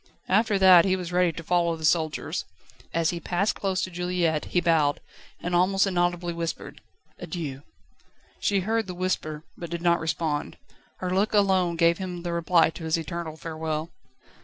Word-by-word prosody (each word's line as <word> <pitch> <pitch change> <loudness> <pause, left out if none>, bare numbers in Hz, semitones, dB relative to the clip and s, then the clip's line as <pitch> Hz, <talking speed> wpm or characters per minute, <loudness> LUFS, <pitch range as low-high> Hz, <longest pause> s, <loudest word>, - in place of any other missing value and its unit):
After 210 +1 +3
that 185 -3 +8
he 185 +1 +2
was 180 -2 -5
ready 180 -1 +3
to 165 +1 -8
follow 170 0 +1
the 160 -1 -5
soldiers. 155 -2 0 0.5
As 165 0 +1
he 175 - -4
passed 180 +4 0
close 190 -2 -1
to 185 - -4
Juliette 175 -3 0
he 180 - +1
bowed, 160 -4 +2 0.4
and 175 - -4
almost 190 +3 +3
inaudibly 175 -2 0
whispered: 165 -1 -5 0.4
"Adieu!" 145 -7 -5 0.8
She 200 -2 +1
heard 220 +2 0
the 180 - -6
whisper, 160 -4 -2
but 170 - -7
did 170 +1 -5
not 170 0 +3
respond. 160 -2 -2 0.4
Her 180 -1 -1
look 205 +3 +1
alone 190 -4 +3
gave 170 +1 +3
him 180 -2 -5
the 175 -1 -3
reply 170 -1 +3
to 165 - -10
his 160 +1 +1
eternal 165 0 -5
farewell. 160 0 -4
175 Hz, 170 wpm, -26 LUFS, 165-185 Hz, 0.8 s, that